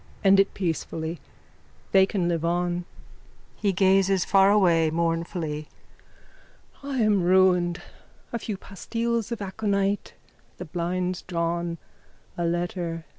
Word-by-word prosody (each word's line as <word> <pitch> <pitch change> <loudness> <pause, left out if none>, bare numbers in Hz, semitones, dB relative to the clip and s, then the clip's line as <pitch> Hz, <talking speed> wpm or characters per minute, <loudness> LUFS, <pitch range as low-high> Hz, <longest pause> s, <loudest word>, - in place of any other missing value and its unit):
End 195 0 +6
it 195 - +2
peacefully. 165 -2 -3 0.7
They 190 -1 +5
can 185 -4 -1
live 165 -2 -1
on. 175 +1 0 0.7
(He 205 -2 0
gazes 190 0 +3
far 195 0 +5
away 175 -6 +4
mournfully.) 165 -2 -2 1.1
I 280 -1 -4
am 210 -3 +3
ruined. 180 -1 +3 0.5
A 235 - -1
few 210 -2 -4
pastilles 230 +4 -3
of 230 -3 -3
aconite. 200 0 -1 0.4
The 180 - -6
blinds 180 +2 -2
drawn. 170 -1 -2 0.6
A 175 - -2
letter. 170 -1 -2
180 Hz, 115 wpm, -25 LUFS, 170-195 Hz, 1.1 s, End